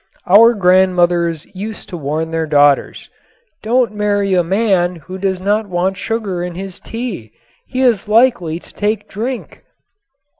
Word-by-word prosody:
Our 225 +6 +6
grandmothers 180 -3 +2
used 210 +3 -6
to 180 - -6
warn 155 +2 -3
their 165 -1 -1
daughters: 145 -1 +2 0.5
"Don't 235 0 +1
marry 205 -2 0
a 180 -1 +3
man 185 -1 +1
who 185 +3 -9
does 190 -1 -1
not 205 +2 0
want 185 +2 0
sugar 205 -5 -3
in 175 -1 -5
his 190 0 -7
tea. 220 - -6 0.3
He 260 0 -3
is 235 -6 +2
likely 210 -8 +2
to - - -14
take 210 0 -1
to - - -38
drink." 240 +4 -5
190 Hz, 150 wpm, -16 LUFS, 175-215 Hz, 0.5 s, Our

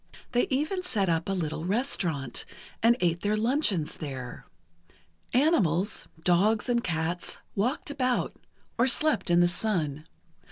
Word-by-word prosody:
They 245 - +2
even 305 +8 0
set 205 - 0
up 165 +2 0
a - - +1
little 160 -4 -3
restaurant, 175 - -1 0.4
and 235 +2 +5
ate 170 -1 +1
their 210 +1 +1
luncheons 215 - +1
there. 130 -5 -7 0.9
Animals—dogs 200 - +2
and 240 -1 +2
cats—walked 180 - -2
about, 255 -3 0 0.4
or 240 - +4
slept 265 - +2
in 175 0 +5
the 175 - +5
sun. 165 -6 -1
195 Hz, 120 wpm, -28 LUFS, 165-245 Hz, 0.9 s, and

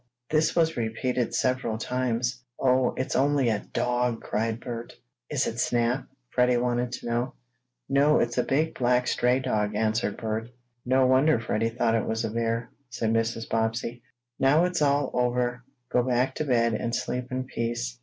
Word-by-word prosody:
This 155 +1 +2
was 165 -1 +2
repeated 120 +1 -1
several 125 -3 0
times. 125 +1 -1 0.2
"Oh, 130 -1 +2
it's 130 - -2
only 140 -2 +3
a 105 -2 -2
dog!" 125 -1 0
cried 110 +1 -1
Bert. 120 -1 -6 0.4
"Is - - 0
it - - -3
Snap?" 120 +2 +1 0.3
Freddie 125 0 +3
wanted 120 0 0
to - - -6
know. 120 +2 -1 0.5
"No, 140 +2 +4
it's 120 +1 0
a - - +3
big 155 +4 +1
black 125 0 +2
stray 125 +1 +2
dog," 105 -5 -1
answered 110 -1 0
Bert. 110 0 -3 0.3
"No 130 +1 +3
wonder 130 +1 +4
Freddie 115 0 0
thought 115 -1 0
it 115 - 0
was 110 +1 -1
a 110 - -3
bear," 115 +1 -1 0.2
said 115 -2 -1
Mrs. 115 0 -1
Bobbsey. 115 +2 -1 0.4
"Now 150 +6 +4
it's 180 -2 -1
all 140 -1 +2
over, 125 0 0 0.3
go 125 - +3
back 125 +1 +1
to 155 - -3
bed, 115 -4 +2
and 115 +2 -1
sleep 125 0 -3
in 130 0 -1
peace." 115 - -3
125 Hz, 170 wpm, -27 LUFS, 115-130 Hz, 0.5 s, No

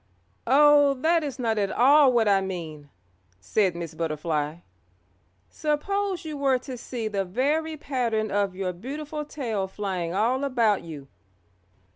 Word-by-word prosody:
"Oh, 290 +1 +6
that 325 +5 +2
is 285 -3 -5
not 225 -4 0
at 200 -1 0
all 275 +2 +5
what 235 -3 +2
I 195 -1 +4
mean," 160 -6 -6 0.5
said 180 - 0
Miss 170 -2 -6
Butterfly. 155 -1 -2 0.9
"Suppose 370 +5 -2
you 305 -2 -5
were 270 -2 +2
to 255 +1 -8
see 235 -2 -5
the 200 -2 -1
very 295 - -1
pattern 235 -7 -1
of 200 -2 0
your 185 -1 -3
beautiful 295 - -6
tail 230 -10 -3
flying 190 -4 -3
all 235 +8 +1
about 235 -7 +2
you. 150 -5 -9
230 Hz, 140 wpm, -25 LUFS, 185-285 Hz, 0.9 s, Oh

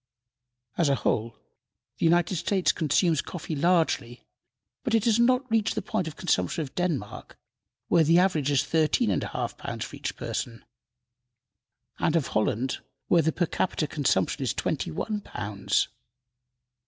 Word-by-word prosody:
As 165 -4 +4
a 140 - +3
whole, 115 -2 -1 0.6
the - - +1
United 175 +2 +3
States 185 +3 +2
consumes 160 0 +2
coffee 165 -2 -6
largely, 155 -7 +1 0.6
but 245 -4 +1
it 225 0 +2
has 230 -1 +3
not 255 +2 +3
reached 220 -1 +2
the - - -1
point 185 -3 -2
of 155 - -6
consumption 160 - 0
of 135 - -9
Denmark, 155 - -3 0.5
where 170 - +4
the 165 +2 +4
average 175 -6 +2
is 140 -3 +3
thirteen 160 -2 +2
and - - 0
a - - -3
half - - -4
pounds - - -4
for - - -9
each - - -4
person, 115 -1 -4 1.3
and 160 - +1
of 160 -5 +1
Holland, 115 +4 0 0.3
where 170 - +5
the 160 +1 +1
per 175 - 0
capita 165 -1 -1
consumption 145 -2 0
is - - -1
twenty - - -1
one 210 - -3
pounds. 100 -1 -1
160 Hz, 155 wpm, -27 LUFS, 135-180 Hz, 1.3 s, where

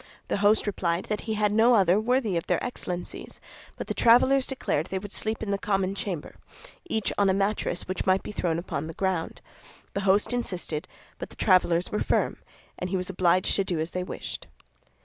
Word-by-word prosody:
The - - +1
host 205 +2 +3
replied 180 -4 -1
that 210 -1 -1
he 220 - 0
had 210 -1 +2
no 225 +3 +5
other 190 -1 +4
worthy 230 -3 +1
of 170 - -2
their - - +1
Excellencies; 180 -7 -5 0.4
but - - -4
the - - -3
travelers 255 +3 +5
declared 180 - -1
they 190 - -3
would 205 +1 -7
sleep 220 +1 -2
in 205 - -2
the 200 - 0
common 195 -2 0
chamber, 190 -6 -5 0.5
each 220 -7 0
on 200 -1 +4
a 190 - +3
mattress 195 -3 -1
which 185 +1 -3
might 185 0 +3
be - - -6
thrown 170 -5 -1
upon 160 -3 -4
the 165 - -8
ground. 190 -4 -2 0.5
The 200 - -1
host 200 +4 +3
insisted; 180 -10 -3 0.3
but - - -6
the - - -13
travelers 180 -3 +3
were 210 - 0
firm, - - +1 0.4
and 180 - -3
he 190 - 0
was 185 +1 -2
obliged 185 0 +2
to 195 - +2
do 180 -4 -2
as 160 +2 -2
they 180 - -2
wished. - - -7
195 Hz, 205 wpm, -27 LUFS, 180-210 Hz, 0.5 s, no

